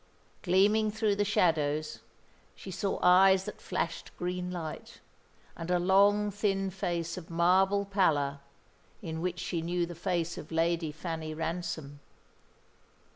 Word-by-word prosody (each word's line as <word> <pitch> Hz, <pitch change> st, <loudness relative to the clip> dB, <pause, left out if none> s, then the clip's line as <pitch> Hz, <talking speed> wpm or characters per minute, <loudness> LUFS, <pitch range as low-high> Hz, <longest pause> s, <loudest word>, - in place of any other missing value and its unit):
Gleaming 205 Hz, +4 st, +3 dB
through 215 Hz, -1 st, 0 dB
the 205 Hz, -, +1 dB
shadows, 155 Hz, -6 st, +1 dB, 0.6 s
she 190 Hz, -, -9 dB
saw 190 Hz, +2 st, -2 dB
eyes 190 Hz, +1 st, +6 dB
that -, -, -8 dB
flashed -, -, -3 dB
green 180 Hz, 0 st, -3 dB
light, 165 Hz, -4 st, -7 dB, 0.6 s
and 165 Hz, +1 st, -7 dB
a 180 Hz, -, +3 dB
long, 200 Hz, +3 st, +3 dB
thin 195 Hz, -1 st, -1 dB
face 170 Hz, -2 st, -3 dB
of 175 Hz, -2 st, -9 dB
marble 190 Hz, +4 st, +3 dB
pallor, 150 Hz, -8 st, +1 dB, 0.6 s
in 160 Hz, -2 st, -4 dB
which 180 Hz, 0 st, -2 dB
she 175 Hz, -1 st, -3 dB
knew 175 Hz, +1 st, -1 dB
the 175 Hz, -, -8 dB
face 170 Hz, -1 st, -2 dB
of 155 Hz, -, -11 dB
Lady 165 Hz, -1 st, 0 dB
Fanny 160 Hz, 0 st, -5 dB
Ransom. 160 Hz, -3 st, -4 dB
175 Hz, 130 wpm, -30 LUFS, 165-195 Hz, 0.6 s, eyes